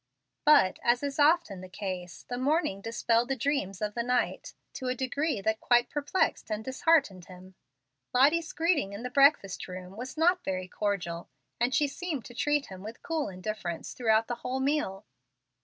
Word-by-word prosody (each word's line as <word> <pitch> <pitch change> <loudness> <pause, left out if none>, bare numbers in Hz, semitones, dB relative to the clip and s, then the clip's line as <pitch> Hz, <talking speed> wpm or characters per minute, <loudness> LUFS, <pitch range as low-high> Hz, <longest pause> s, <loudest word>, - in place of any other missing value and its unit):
But, 290 -11 +5
as 240 +3 +2
is 280 +1 -3
often 295 - +3
the 185 - -10
case, 185 -3 -6
the 245 0 -4
morning 275 - +1
dispelled 230 +2 +1
the 270 - +1
dreams 230 -7 -1
of 210 0 -2
the 235 - -1
night, 250 +1 -1 0.2
to 260 - -5
a 250 - 0
degree 265 -1 -1
that 220 +2 0
quite 240 0 +3
perplexed 295 +1 0
and 215 0 -3
disheartened 260 - +2
him. 185 0 -13 0.6
Lottie's 305 +6 +3
greeting 320 - +1
in 205 +4 -7
the 250 - -4
breakfast 275 -8 +3
room 185 +1 -8
was 250 +6 -7
not 350 +3 +3
very 185 -1 -3
cordial, 180 -4 -3 0.3
and 240 +2 +2
she 295 - +3
seemed 300 -3 -4
to 240 - -10
treat 295 +3 +1
him 190 -1 -10
with 220 +3 -9
cool 320 -6 -1
indifference 185 -2 -5
throughout 225 -2 +2
the 240 - -3
whole 250 +2 -3
meal. 270 -8 -1
240 Hz, 175 wpm, -29 LUFS, 195-285 Hz, 0.6 s, But